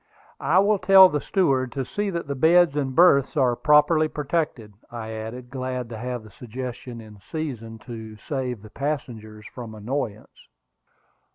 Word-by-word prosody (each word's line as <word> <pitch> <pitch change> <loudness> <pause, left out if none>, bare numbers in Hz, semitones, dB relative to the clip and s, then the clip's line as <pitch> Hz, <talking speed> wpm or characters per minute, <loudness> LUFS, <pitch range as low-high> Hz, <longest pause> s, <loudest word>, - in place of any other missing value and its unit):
"I 170 - +2
will 200 +1 +4
tell 190 0 +8
the 150 -3 -2
steward 135 -10 +1
to 135 -2 -3
see 205 +10 -2
that 170 -3 -3
the 140 - -3
beds 165 +3 +4
and 135 -3 -2
berths 155 -4 +5
are 125 -3 +3
properly 155 +3 +4
protected," 150 -8 -3 0.2
I 115 -2 -7
added, 115 +3 -7
glad 130 -2 -4
to 115 - -7
have 125 -1 -4
the 110 - -14
suggestion 125 +1 -7
in 105 -2 -13
season 120 -8 -5
to 110 -3 -8
save 125 -6 -3
the 110 - -13
passengers 115 -7 -5
from 115 -3 -8
annoyance. 110 -1 -5
130 Hz, 160 wpm, -24 LUFS, 115-155 Hz, 0.2 s, tell